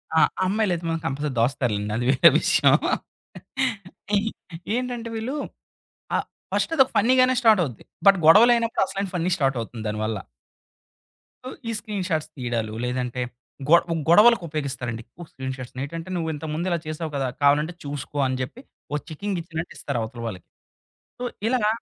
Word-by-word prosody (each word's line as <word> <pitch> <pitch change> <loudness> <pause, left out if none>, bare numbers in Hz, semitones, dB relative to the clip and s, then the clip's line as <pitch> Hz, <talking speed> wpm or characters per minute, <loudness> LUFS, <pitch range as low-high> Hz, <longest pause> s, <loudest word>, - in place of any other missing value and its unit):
ఆ! - - +6 0.3
అమ్మాయిలయితే 185 -3 0
మాత్రం 165 0 -1
కంపల్సరీ 145 -1 -2
దాస్తారులెండి 115 -4 0
అది 120 - -1
వేరే 130 -1 +7
విషయం. - - +4 1.4
ఈ - - +4 0.6
ఏంటంటే 245 -2 -3
వీళ్ళు 230 +6 -3 0.8
అ - - +4 0.4
ఫస్ట్‌ - - 0
అదోక 265 -2 +6
ఫన్నీగానే 255 +3 +4
స్టార్ట్ 220 -5 +6
అవుద్ది. 130 -8 -6 0.2
బట్ 195 -1 +8
గొడవలయినప్పుడసలైన 215 -1 +4
ఫన్నీ 175 +1 0
స్టార్ట్ 135 -4 +1
అవుతుంది 115 0 -7
దాని 105 0 -3
వల్ల. 110 -1 -2 1.3
ఉ - - -4 0.2
ఈ - - 0
స్క్రీన్‌షాట్స్ 185 -8 -2
తీయడాలు 120 -5 -2
లేదంటే 125 0 -2 0.5
గొ 170 - +9 0.3
గొడవలకు 210 +4 +7
ఉపయోగిస్తారండి 130 -6 -3
ఎక్కువ 175 +9 -13
స్క్రీన్‌షాట్స్. 130 -1 -6
నేటంటే 165 +6 -5
నువ్వు 165 -2 -1
ఇంతకు 150 +1 -5
ముందు 170 +4 -2
ఇలా 170 - +1
చేసావు 155 0 -4
గదా! 135 -1 0 0.2
కావాలంటే 150 +4 +4
చూసుకో 145 0 -5
అని 130 0 -2
చెప్పి 140 - -6 0.3
ఒక 150 - +1
చెకింగ్ 190 +4 -3
ఇచ్చినట్టు 165 0 -6
ఇస్తారు 140 -4 -3
అవతలి 115 +1 -6
వాళ్ళకి. 95 -6 -7 0.7
సో - - -4 0.2
ఇలాగ 235 -3 +2
155 Hz, 145 wpm, -24 LUFS, 130-200 Hz, 1.4 s, గొ